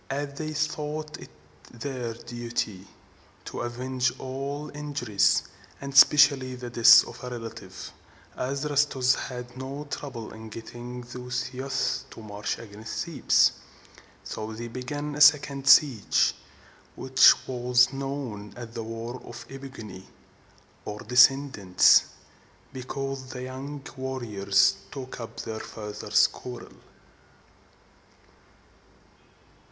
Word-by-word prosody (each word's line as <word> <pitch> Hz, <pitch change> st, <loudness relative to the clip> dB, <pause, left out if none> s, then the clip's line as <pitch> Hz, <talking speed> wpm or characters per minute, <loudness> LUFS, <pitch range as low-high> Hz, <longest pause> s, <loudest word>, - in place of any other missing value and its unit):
As 140 Hz, +1 st, -3 dB
they 155 Hz, +2 st, -5 dB
thought 150 Hz, 0 st, -3 dB
it -, -, -11 dB, 0.4 s
their 120 Hz, -1 st, -5 dB
duty 115 Hz, -5 st, -5 dB, 0.6 s
to -, -, -5 dB
avenge 125 Hz, +1 st, -1 dB
all 140 Hz, +3 st, -5 dB
injuries, 145 Hz, -8 st, +1 dB, 0.4 s
and 140 Hz, 0 st, -7 dB
especially 135 Hz, -2 st, +6 dB
the 125 Hz, -1 st, -7 dB
death 120 Hz, 0 st, +8 dB
of -, -, -11 dB
a 125 Hz, -, -5 dB
relative, 115 Hz, -2 st, -8 dB, 0.4 s
Adrastus 140 Hz, -1 st, +1 dB
had 125 Hz, -1 st, -6 dB
no 135 Hz, +3 st, -6 dB
trouble 120 Hz, -6 st, -6 dB
in 110 Hz, 0 st, -10 dB
getting 120 Hz, +3 st, -8 dB
these 125 Hz, +1 st, -5 dB
youths 130 Hz, 0 st, -2 dB
to -, -, -12 dB
march 105 Hz, -1 st, -4 dB
against 110 Hz, +3 st, -6 dB
Thebes. 170 Hz, -3 st, +3 dB, 0.7 s
So 110 Hz, 0 st, -6 dB
they 120 Hz, +2 st, -6 dB
began 145 Hz, +5 st, -5 dB
a 145 Hz, -, -4 dB
second 140 Hz, -2 st, +5 dB
siege, 135 Hz, -5 st, +5 dB, 0.6 s
which 130 Hz, 0 st, +6 dB
was 125 Hz, 0 st, +3 dB
known 135 Hz, -7 st, -5 dB
as 120 Hz, -1 st, -8 dB
the 115 Hz, -, -5 dB
War 115 Hz, +2 st, -6 dB
of 120 Hz, 0 st, -10 dB
the -, -, -12 dB
E 135 Hz, -, -7 dB
pig´o 135 Hz, -4 st, -9 dB
ni, 95 Hz, -3 st, -10 dB, 0.8 s
or 105 Hz, 0 st, -6 dB
descendants, 125 Hz, -5 st, +5 dB, 0.7 s
because 135 Hz, +1 st, -5 dB
the 125 Hz, -1 st, -7 dB
young 135 Hz, +2 st, -7 dB
warriors 115 Hz, -7 st, +1 dB
took 130 Hz, -2 st, -7 dB
up 115 Hz, -, -7 dB
their 110 Hz, 0 st, -5 dB
fathers' 105 Hz, -1 st, 0 dB
quarrel. -, -, -7 dB
125 Hz, 115 wpm, -27 LUFS, 115-140 Hz, 0.8 s, death